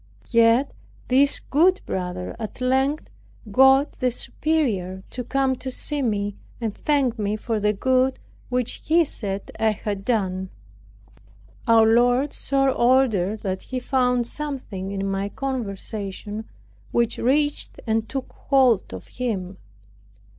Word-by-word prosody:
Yet 230 Hz, +3 st, +4 dB, 0.4 s
this 275 Hz, +2 st, +5 dB
good 360 Hz, +6 st, +2 dB
brother 180 Hz, 0 st, -4 dB
at 220 Hz, +2 st, -6 dB
length 265 Hz, +4 st, +1 dB, 0.4 s
got 265 Hz, +5 st, +5 dB
the 255 Hz, -, +2 dB
superior 225 Hz, -, -1 dB
to 250 Hz, -, -4 dB
come 265 Hz, +1 st, +1 dB
to 260 Hz, -, -6 dB
see 290 Hz, +3 st, -2 dB
me, 205 Hz, -4 st, -1 dB, 0.2 s
and 225 Hz, -3 st, -2 dB
thank 265 Hz, -5 st, 0 dB
me 205 Hz, 0 st, 0 dB
for 220 Hz, 0 st, -2 dB
the 210 Hz, 0 st, +2 dB
good 260 Hz, +5 st, +1 dB, 0.3 s
which 250 Hz, -1 st, -2 dB
he 335 Hz, +2 st, +4 dB
said 200 Hz, -7 st, -4 dB
I 220 Hz, -, +3 dB
had 205 Hz, -2 st, -3 dB
done. 190 Hz, -5 st, -1 dB, 1.2 s
Our 225 Hz, -1 st, +6 dB
Lord 245 Hz, +5 st, +3 dB
so 275 Hz, -1 st, +1 dB
ordered, 235 Hz, -6 st, +2 dB
that 190 Hz, -1 st, -3 dB
he 255 Hz, -, -4 dB
found 250 Hz, -1 st, +1 dB
something 250 Hz, -9 st, -5 dB
in 195 Hz, 0 st, -3 dB
my 195 Hz, +1 st, -2 dB
conversation 210 Hz, -4 st, -5 dB, 0.4 s
which 235 Hz, -1 st, 0 dB
reached 290 Hz, +4 st, +1 dB
and 225 Hz, -1 st, 0 dB
took 270 Hz, -1 st, -5 dB
hold 260 Hz, -7 st, +2 dB
of -, -, -9 dB
him. 195 Hz, -7 st, -4 dB
240 Hz, 130 wpm, -23 LUFS, 205-265 Hz, 1.2 s, Our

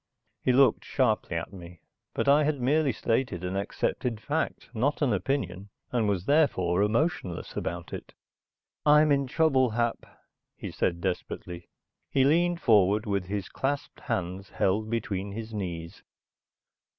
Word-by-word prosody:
He -, -, +2 dB
looked 130 Hz, -2 st, +4 dB
sharply 85 Hz, -, 0 dB
at 85 Hz, -, -5 dB
me, 85 Hz, -2 st, -11 dB, 0.3 s
but -, -, -1 dB
I 145 Hz, +2 st, +6 dB
had 145 Hz, -1 st, 0 dB
merely 140 Hz, +3 st, +2 dB
stated 115 Hz, -5 st, -1 dB
an 90 Hz, +1 st, -3 dB
accepted 110 Hz, +3 st, -2 dB
fact, 145 Hz, +1 st, -3 dB
not 140 Hz, +6 st, 0 dB
an 125 Hz, -6 st, +2 dB
opinion, 100 Hz, -3 st, -2 dB, 0.2 s
and 115 Hz, -4 st, +1 dB
was 95 Hz, -2 st, -1 dB
therefore 100 Hz, -, +3 dB
emotionless 110 Hz, -, -1 dB
about -, -, -4 dB
it. -, -, -8 dB, 0.7 s
"I'm 150 Hz, 0 st, +6 dB
in 140 Hz, -1 st, +2 dB
trouble, 135 Hz, -3 st, +3 dB
Hap," 120 Hz, +1 st, -1 dB, 0.5 s
he -, -, -7 dB
said 85 Hz, -1 st, -1 dB
desperately. 90 Hz, -1 st, -4 dB, 0.4 s
He 135 Hz, -, +3 dB
leaned 170 Hz, +4 st, +3 dB
forward 105 Hz, -1 st, +4 dB
with 100 Hz, -3 st, -1 dB
his 100 Hz, +1 st, -3 dB
clasped 140 Hz, +1 st, -3 dB
hands 95 Hz, +2 st, -3 dB
held 110 Hz, +3 st, 0 dB
between 100 Hz, -4 st, -2 dB
his 110 Hz, +1 st, -6 dB
knees. 85 Hz, -5 st, -5 dB
110 Hz, 140 wpm, -28 LUFS, 95-140 Hz, 0.7 s, I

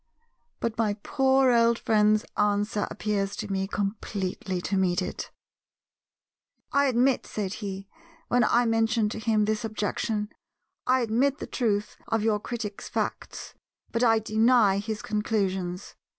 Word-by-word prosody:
But 230 Hz, -1 st, -3 dB
my 210 Hz, -3 st, +1 dB
poor 265 Hz, -1 st, +3 dB
old 235 Hz, -1 st, +4 dB
friend's 215 Hz, -1 st, +3 dB
answer 205 Hz, 0 st, +1 dB
appears 200 Hz, -2 st, -2 dB
to -, -, -5 dB
me 195 Hz, 0 st, -1 dB
completely 195 Hz, -2 st, -3 dB
to 195 Hz, -, -2 dB
meet 185 Hz, -1 st, +2 dB
it. 185 Hz, -, -4 dB, 1.4 s
"I 280 Hz, 0 st, +3 dB
admit," 255 Hz, 0 st, +2 dB
said 200 Hz, -3 st, -3 dB
he—when 245 Hz, +8 st, -3 dB
I 240 Hz, +2 st, +3 dB
mentioned 225 Hz, -1 st, +1 dB
to -, -, -5 dB
him 220 Hz, -2 st, +2 dB
this 215 Hz, +2 st, -1 dB
objection—"I 215 Hz, +3 st, -3 dB
admit 250 Hz, +5 st, +1 dB
the -, -, -6 dB
truth 210 Hz, -4 st, -1 dB
of 225 Hz, -1 st, 0 dB
your 215 Hz, -2 st, +2 dB
critic's 215 Hz, -2 st, -6 dB
facts, -, -, -4 dB, 0.4 s
but 230 Hz, -, 0 dB
I 225 Hz, -2 st, +5 dB
deny 220 Hz, -2 st, +3 dB
his 215 Hz, +1 st, -4 dB
conclusions. 195 Hz, -4 st, -2 dB
215 Hz, 130 wpm, -27 LUFS, 205-235 Hz, 1.4 s, I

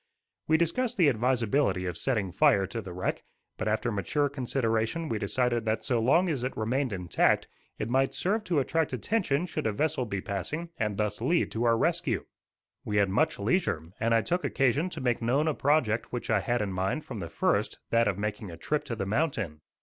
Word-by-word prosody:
We 160 Hz, -, +4 dB
discussed 195 Hz, +10 st, 0 dB
the 170 Hz, -6 st, +5 dB
advisability 120 Hz, -4 st, +1 dB
of 90 Hz, -, -3 dB
setting 110 Hz, -8 st, -1 dB
fire 95 Hz, +4 st, +4 dB
to 115 Hz, +4 st, -5 dB
the 95 Hz, -4 st, -8 dB
wreck, 90 Hz, +1 st, -2 dB, 0.3 s
but 110 Hz, -, -3 dB
after 110 Hz, +3 st, 0 dB
mature 145 Hz, +8 st, 0 dB
consideration 130 Hz, +2 st, -1 dB
we 110 Hz, -, -1 dB
decided 120 Hz, +3 st, 0 dB
that 110 Hz, 0 st, 0 dB
so 125 Hz, -4 st, +1 dB
long 165 Hz, +11 st, +3 dB
as 140 Hz, -7 st, -1 dB
it 130 Hz, -, -3 dB
remained 125 Hz, +4 st, 0 dB
intact, 90 Hz, -3 st, +1 dB, 0.3 s
it -, -, -3 dB
might 135 Hz, +3 st, +1 dB
serve 210 Hz, +4 st, 0 dB
to 175 Hz, -5 st, 0 dB
attract 155 Hz, +1 st, +1 dB
attention 165 Hz, -, 0 dB
should 165 Hz, -, -3 dB
a -, -, +1 dB
vessel 145 Hz, +2 st, -1 dB
be 100 Hz, -2 st, -2 dB
passing, 125 Hz, -, -4 dB
and 105 Hz, -3 st, -1 dB
thus 105 Hz, +1 st, -1 dB
lead 165 Hz, +8 st, +1 dB
to 115 Hz, +2 st, -1 dB
our 115 Hz, -1 st, +4 dB
rescue. -, -, +1 dB, 0.6 s
We 105 Hz, -, -1 dB
had 100 Hz, -1 st, +3 dB
much 95 Hz, -, +1 dB
leisure, 100 Hz, -, 0 dB
and 115 Hz, +1 st, +2 dB
I 115 Hz, -, +4 dB
took 180 Hz, +1 st, -1 dB
occasion 135 Hz, +6 st, +1 dB
to -, -, -7 dB
make 120 Hz, -2 st, 0 dB
known 135 Hz, +7 st, +2 dB
a 155 Hz, -, +2 dB
project 135 Hz, -7 st, +1 dB
which 120 Hz, -2 st, -3 dB
I 105 Hz, -, +4 dB
had 120 Hz, +4 st, 0 dB
in 100 Hz, -2 st, -3 dB
mind 95 Hz, +12 st, -1 dB
from 115 Hz, -5 st, -6 dB
the 85 Hz, -3 st, -5 dB
first, -, -, 0 dB
that 115 Hz, -1 st, +4 dB
of 100 Hz, -2 st, 0 dB
making 105 Hz, -1 st, -3 dB
a 85 Hz, -, -9 dB
trip 150 Hz, -, -1 dB
to 115 Hz, -, -3 dB
the 100 Hz, -, -3 dB
mountain. 105 Hz, -, -1 dB
120 Hz, 210 wpm, -28 LUFS, 105-145 Hz, 0.6 s, the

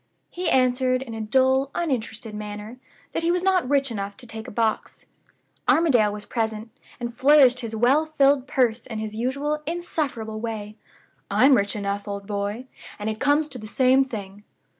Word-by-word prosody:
He 360 Hz, 0 st, -2 dB
answered, 255 Hz, 0 st, +2 dB
in 235 Hz, -4 st, -9 dB
a 225 Hz, -, -5 dB
dull, 260 Hz, +4 st, +2 dB
uninterested 230 Hz, -8 st, -3 dB
manner, 210 Hz, +3 st, -7 dB, 0.3 s
that -, -, -1 dB
he 335 Hz, -, 0 dB
was 355 Hz, +1 st, +1 dB
not 370 Hz, -8 st, +2 dB
rich 275 Hz, -2 st, +2 dB
enough 200 Hz, -2 st, -5 dB
to 255 Hz, -, -12 dB
take 220 Hz, -1 st, -8 dB
a -, -, -7 dB
box. 220 Hz, 0 st, -2 dB, 0.6 s
Armadale 250 Hz, -11 st, +4 dB
was 205 Hz, 0 st, -4 dB
present, 220 Hz, -1 st, -3 dB, 0.3 s
and 240 Hz, -1 st, -4 dB
flourished 260 Hz, 0 st, +5 dB
his 230 Hz, -3 st, -4 dB
well 265 Hz, +8 st, +3 dB
filled 280 Hz, -3 st, +3 dB
purse 245 Hz, -3 st, +1 dB
in 225 Hz, -3 st, -5 dB
his 215 Hz, 0 st, -4 dB
usual 280 Hz, +6 st, -1 dB
insufferable 290 Hz, -10 st, -3 dB
way. 215 Hz, -2 st, -5 dB, 0.5 s
'I'm 270 Hz, +2 st, +5 dB
rich 205 Hz, -3 st, +2 dB
enough, 200 Hz, 0 st, -3 dB
old 200 Hz, 0 st, -5 dB
boy, 205 Hz, +4 st, -3 dB, 0.3 s
and 210 Hz, +1 st, -2 dB
it 215 Hz, -, -7 dB
comes 290 Hz, +2 st, +2 dB
to 255 Hz, -, -7 dB
the 215 Hz, -, -8 dB
same 260 Hz, +4 st, +4 dB
thing. 205 Hz, -5 st, -8 dB
240 Hz, 175 wpm, -24 LUFS, 215-270 Hz, 0.6 s, flourished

